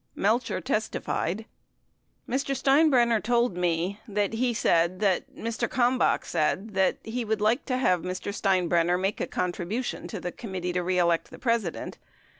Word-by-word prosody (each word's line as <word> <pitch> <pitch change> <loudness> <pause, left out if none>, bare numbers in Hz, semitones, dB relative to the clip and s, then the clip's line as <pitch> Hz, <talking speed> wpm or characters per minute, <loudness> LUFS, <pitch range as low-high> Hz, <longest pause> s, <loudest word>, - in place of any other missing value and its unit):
Melcher 230 +4 +1
testified: 220 -4 -2 0.8
Mr. 275 +1 -1
Steinbrenner 265 -5 +4
told 240 -2 +1
me 180 +3 -1
that 205 0 -1
he 245 +2 +1
said 175 -4 +2
that, 195 -3 0
Mr. 230 +1 -3
Kalmbach 250 0 +2
said 195 +7 -1
that 190 0 +2
he 235 +2 -3
would 220 -1 -1
like 220 +6 +1
to 255 -2 -1
have 180 -9 +2
Mr. 185 +3 -4
Steinbrenner 180 -3 +2
make 195 +2 -1
a - - -1
con 180 -1 -1
tribution 210 +9 -4
in 205 -6 -5
the 180 - -3
Committee 185 -5 -5
to 180 - 0
Re 180 +1 0
Elect 170 -2 +2
the - - -11
President. 230 -8 -2
205 Hz, 160 wpm, -27 LUFS, 180-235 Hz, 0.8 s, Steinbrenner